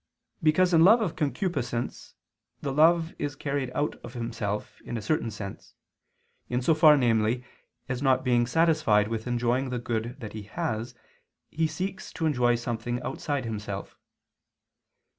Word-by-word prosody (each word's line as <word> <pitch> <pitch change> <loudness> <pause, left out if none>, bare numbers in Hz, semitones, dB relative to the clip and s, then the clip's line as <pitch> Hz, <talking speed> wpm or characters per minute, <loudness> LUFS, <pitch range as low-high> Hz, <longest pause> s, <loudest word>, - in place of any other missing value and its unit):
Because 175 +3 +3
in 165 -1 +6
love 220 +7 +7
of 205 -8 -1
concupiscence, 145 - -2 0.4
the 135 - -3
lover 165 +3 +4
is 145 0 -3
carried 140 -2 -2
out 150 - -1
of - - -9
himself, 115 -3 -4
in 120 - -4
a - - -4
certain 115 +2 0
sense; 100 -2 -8 0.7
in 125 - 0
so 160 - +4
far, 155 -1 +7
namely, 115 -1 +2 0.4
as 125 0 -3
not 130 -2 +3
being 120 -2 +2
satisfied 155 -9 +3
with 115 +1 -3
enjoying 120 +2 0
the 125 - -2
good 120 +1 -3
that 110 -4 -7
he 110 - -6
has, 115 0 -4 0.6
he 160 +1 +1
seeks 185 +4 -5
to 165 -1 -2
enjoy 125 -5 +3
something 120 +1 -3
outside 140 -1 -3
himself. 105 -3 -5
125 Hz, 150 wpm, -27 LUFS, 115-155 Hz, 0.7 s, love